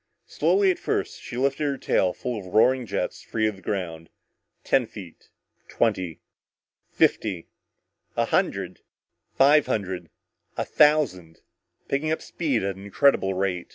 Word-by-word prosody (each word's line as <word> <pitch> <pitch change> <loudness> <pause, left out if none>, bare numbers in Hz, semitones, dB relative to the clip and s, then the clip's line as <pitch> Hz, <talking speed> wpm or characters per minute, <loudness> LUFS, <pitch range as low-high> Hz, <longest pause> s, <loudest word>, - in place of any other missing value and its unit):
Slowly 395 -1 +2
at 360 - -4
first, 410 -2 -2
she 120 - -7
lifted 135 +3 0
her 140 -1 -1
tail 95 -7 +1
full 120 +3 -4
of 90 -1 -9
roaring 125 +2 +4
jets - - -3
free 110 -1 -1
of 105 - -2
the - - -15
ground. 85 -4 -4 0.5
Ten 130 -4 +2
feet 95 -7 -12 0.4
twenty 95 -8 -1 0.7
fifty 95 -6 +1 0.7
a - - +3
hundred - - -1 0.6
five 145 +2 +5
hundred 95 -5 -3 0.5
a - - -1
thousand 140 - +2 0.5
picking 150 +3 -1
up 160 - -2
speed 140 - -1
at 100 -1 -2
an 95 - -11
incredible 100 -2 +2
rate. 95 -2 -1
110 Hz, 140 wpm, -25 LUFS, 95-140 Hz, 0.7 s, five